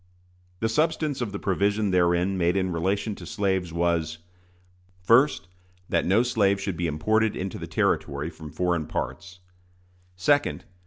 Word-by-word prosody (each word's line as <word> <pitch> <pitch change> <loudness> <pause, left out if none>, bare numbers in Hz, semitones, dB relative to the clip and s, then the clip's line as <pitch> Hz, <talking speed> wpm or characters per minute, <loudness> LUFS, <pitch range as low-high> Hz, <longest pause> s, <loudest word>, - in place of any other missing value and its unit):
The 115 - +2
substance 150 +2 0
of 115 -4 -2
the 100 - -4
provision 100 +2 0
therein 90 +1 +2
made 90 0 +1
in 95 -1 0
relation 95 +6 -1
to - - -10
slaves 95 -3 -1
was: 85 -2 0 0.9
1st. 130 +6 +5 0.5
That - - +1
no 100 +6 +4
slave 100 -5 +2
should 100 -2 -3
be 85 +1 -1
imported 110 +8 +1
into 95 0 -4
the - - -6
Territory 70 +4 -1
from 80 -1 -10
foreign 85 -1 -1
parts. 90 +1 -5 0.8
2d. 145 +11 +2
95 Hz, 145 wpm, -26 LUFS, 85-105 Hz, 0.9 s, 1st